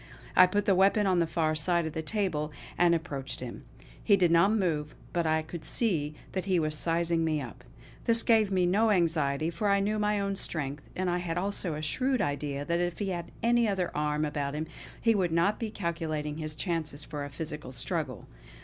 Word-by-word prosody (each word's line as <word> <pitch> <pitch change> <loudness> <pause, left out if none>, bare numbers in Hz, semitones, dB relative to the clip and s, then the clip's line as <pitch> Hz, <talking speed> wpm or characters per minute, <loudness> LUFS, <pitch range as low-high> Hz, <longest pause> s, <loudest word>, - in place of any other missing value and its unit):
I 185 - +8
put 205 +2 0
the 200 - +4
weapon 195 +3 +4
on 185 -2 +3
the 170 - +2
far 160 -1 0
side 170 +2 +2
of 160 - -4
the 160 - -2
table, 160 -5 -1 0.2
and 170 -1 +4
approached 145 -5 -4
him. - - -7 0.4
He 200 -3 +5
did 175 -3 +3
not 170 +4 +5
move, 160 -8 0 0.2
but 170 -2 +1
I 160 0 +2
could 160 +1 -8
see 155 -10 0 0.2
that 185 -1 -3
he 190 -2 +2
was 155 -1 0
sizing 165 +1 +1
me 155 -2 +1
up. 125 -7 -8 0.4
This 230 0 +3
gave 220 -3 +4
me 185 -2 +3
no 210 +6 +3
anxiety, 160 -5 +2
for 210 +4 -1
I 200 0 +4
knew 210 +2 0
my 210 0 +1
own 200 0 -1
strength; 145 -6 -2
and 185 0 -1
I 175 0 +1
had 170 -1 -3
also 185 -3 -1
a 155 - -5
shrewd 255 - +1
idea 145 0 -2
that 170 +2 0
if 175 -1 -1
he 200 -2 -2
had 170 -2 -4
any 235 0 +4
other 190 -3 -1
arm 150 0 0
about 145 -1 -2
him 155 +1 -2 0.3
he 230 - +3
would 185 -5 +1
not 170 +6 +2
be 225 - -2
calculating 160 -6 -3
his 155 -1 -3
chances 155 -4 -2
for 145 -1 -5
a 140 - -5
physical 150 -2 -5
struggle. 135 - -3
170 Hz, 215 wpm, -29 LUFS, 150-195 Hz, 0.4 s, I